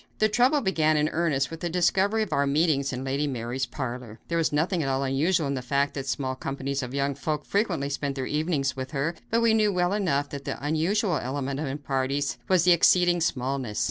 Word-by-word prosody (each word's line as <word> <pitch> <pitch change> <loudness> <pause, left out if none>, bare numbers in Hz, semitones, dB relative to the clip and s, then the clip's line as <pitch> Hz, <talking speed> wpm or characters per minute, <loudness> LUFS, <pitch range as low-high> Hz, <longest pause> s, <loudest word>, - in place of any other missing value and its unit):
The 215 - +3
trouble 255 +7 +3
began 155 - +2
in 150 +1 +2
earnest 155 -5 0
with 165 - -7
the 175 - -2
discovery 190 +5 +2
of 215 - -5
our 140 0 +2
meetings 140 -1 +2
in 130 0 -4
Lady 140 +2 -1
Mary's 125 0 -3
parlor. 120 -3 -6
There 170 - 0
was 165 - +1
nothing 165 +4 +1
at 135 - -1
all 135 +1 0
unusual 150 +5 +1
in 140 - -1
the 130 - -3
fact 140 +3 0
that 135 -1 -5
small 130 +1 -1
companies 135 +1 -3
of 125 +1 -5
young 140 0 0
folk 150 +2 -3
frequently 180 -9 0
spent 140 0 -3
their 130 -2 -3
evenings 150 -2 -1
with 130 -1 -5
her, 145 +4 -1 0.2
but 230 +1 +2
we 230 -1 +4
knew 215 -2 +3
well 180 0 +1
enough 145 -9 0
that 140 -1 -7
the - - -4
unusual 175 +5 +1
element 135 +1 -3
in 155 - -2
our 135 +2 -3
parties 140 0 -2
was 185 -3 +3
their 180 - +7
exceeding 175 0 +4
smallness. 130 -6 -1
145 Hz, 225 wpm, -26 LUFS, 135-175 Hz, 0.2 s, their